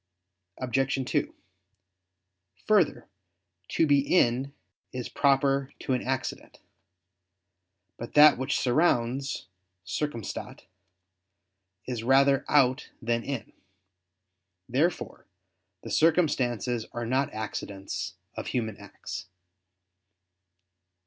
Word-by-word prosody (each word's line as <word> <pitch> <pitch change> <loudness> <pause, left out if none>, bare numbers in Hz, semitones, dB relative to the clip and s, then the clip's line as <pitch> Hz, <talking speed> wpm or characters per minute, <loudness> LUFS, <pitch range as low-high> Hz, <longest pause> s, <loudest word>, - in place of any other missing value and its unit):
Obj. 135 +3 0 0.2
2: - - 0 1.3
Further, 205 -8 +3 0.6
"to 165 - +2
be 145 -2 +4
in" 135 -3 +2 0.4
is 125 -2 -5
proper 140 0 +2
to 130 - -2
an 125 - 0
accident. 130 0 -4 1.4
But 120 - -8
that 150 0 +9
which 130 +2 0
surrounds 130 -1 +1 0.4
(circumstat) 115 +3 -4 1.2
is 125 -3 -3
rather 135 +3 +4
out 130 -3 +3
than 115 -1 -1
in. 140 -5 -5 1.1
Therefore 150 +8 -1 0.6
the - - -7
circumstances 125 - +2
are 120 0 -3
not 130 +3 0
accidents 100 -2 -5 0.2
of - - -5
human 110 -4 -2
acts. 80 - -8
130 Hz, 85 wpm, -28 LUFS, 120-140 Hz, 1.4 s, that